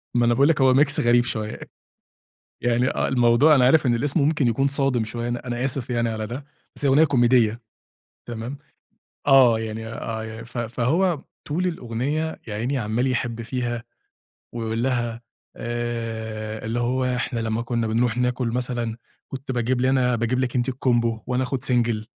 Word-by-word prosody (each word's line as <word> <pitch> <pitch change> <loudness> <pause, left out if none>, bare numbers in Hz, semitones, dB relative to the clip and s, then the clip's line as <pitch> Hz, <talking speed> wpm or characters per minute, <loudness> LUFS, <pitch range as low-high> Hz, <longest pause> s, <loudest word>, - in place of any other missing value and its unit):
ما 120 0 +3
أنا 120 - +3
باقول 140 +4 +4
لِك 155 -3 +2
هو 130 -1 +5
Mix 145 +2 +4
غريب 120 0 +4
شوية، 110 -3 -4 1.0
يعني 120 +1 +2
آه - - -1
الموضوع 125 +4 +5
أنا 130 -3 +4
عارف 145 +3 +4
إن 120 -2 +3
الاسم 145 +6 0
ممكن 145 -2 +2
يكون 125 +4 +2
صادم 135 -4 +1
شوية 120 +2 -4
أنا 120 +1 -4
أنا 120 0 -2
آسف 130 -1 -1
يعني 120 -1 0
على 110 -1 -3
ده، 130 +5 -6 0.3
بس - - -4
هي - - +4
أغنية 140 +4 +6
كوميدية 120 -5 +3 0.7
تمام، 120 +4 -6 0.7
آه، 130 -5 +6
يعني 110 0 -5
آه، 110 0 -5
ف 115 +2 -9
فهو 135 - 0 0.2
طول 175 +5 -1
الأغنية 150 +1 -2
يا 105 - -5
عيني 125 +6 -1
عمّال 115 +2 -1
يحب 120 -2 -2
فيها 120 0 -3 0.7
ويقول 115 0 -2
لها 120 -3 -1 0.4
آآ، 115 -2 -4
اللي 115 +2 -1
هو 125 +2 0
إحنا 125 -1 -1
لما 110 0 -1
كنا 115 -1 -1
بنروح 115 +2 +1
ناكل 125 0 0
مثلًا 120 -1 -2 0.3
كنت 135 0 -6
باجيب 125 0 0
لنا 130 - +3 0.2
أنا 125 - +2
باجيب 120 +2 0
لِك 130 -1 -1
أنتِ 120 0 +1
الCombo 120 -3 +1
وأنا 125 +1 0
آخد 130 0 -3
single 120 -3 +1
120 Hz, 175 wpm, -23 LUFS, 115-130 Hz, 1.0 s, أغنية